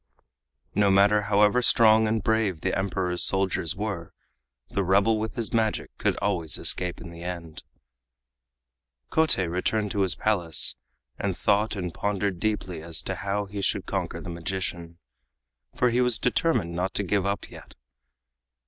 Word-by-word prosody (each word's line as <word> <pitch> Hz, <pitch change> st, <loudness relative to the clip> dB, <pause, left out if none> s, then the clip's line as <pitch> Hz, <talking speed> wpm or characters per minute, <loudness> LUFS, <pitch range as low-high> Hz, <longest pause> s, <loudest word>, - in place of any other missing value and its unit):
No 100 Hz, -1 st, +3 dB
matter 100 Hz, +2 st, +4 dB
however 105 Hz, +4 st, +4 dB
strong 110 Hz, -2 st, +5 dB
and 110 Hz, -2 st, -1 dB
brave 105 Hz, -7 st, 0 dB
the 95 Hz, -, -1 dB
Emperor's 90 Hz, -2 st, -1 dB
soldiers 95 Hz, -4 st, +1 dB
were, 100 Hz, -5 st, -5 dB, 0.5 s
the 100 Hz, -, -1 dB
rebel 100 Hz, +4 st, +3 dB
with 110 Hz, 0 st, -4 dB
his 115 Hz, -2 st, -3 dB
magic 110 Hz, -2 st, -1 dB
could -, -, 0 dB
always 85 Hz, -7 st, -1 dB
escape 90 Hz, -1 st, +1 dB
in 85 Hz, 0 st, -9 dB
the 85 Hz, 0 st, -11 dB
end. 85 Hz, -3 st, -6 dB, 1.5 s
Kotei 160 Hz, -, +3 dB
returned 100 Hz, +5 st, -1 dB
to 100 Hz, -, -1 dB
his 95 Hz, -3 st, +3 dB
Palace, 90 Hz, -7 st, +2 dB, 0.4 s
and 95 Hz, -3 st, -2 dB
thought 105 Hz, +2 st, +1 dB
and 90 Hz, -4 st, -4 dB
pondered 100 Hz, -2 st, -2 dB
deeply 95 Hz, -5 st, -2 dB
as 80 Hz, -1 st, -3 dB
to -, -, -3 dB
how 100 Hz, 0 st, -2 dB
he 100 Hz, 0 st, -6 dB
should -, -, 0 dB
conquer -, -, -3 dB
the -, -, -8 dB
magician, 85 Hz, -1 st, -5 dB, 0.8 s
for 125 Hz, -1 st, +2 dB
he 120 Hz, +2 st, +2 dB
was 125 Hz, -2 st, +2 dB
determined 120 Hz, -, +1 dB
not 90 Hz, +2 st, -2 dB
to 100 Hz, -, 0 dB
give 100 Hz, 0 st, 0 dB
up 100 Hz, 0 st, -3 dB
yet. -, -, -13 dB
100 Hz, 155 wpm, -26 LUFS, 90-110 Hz, 1.5 s, strong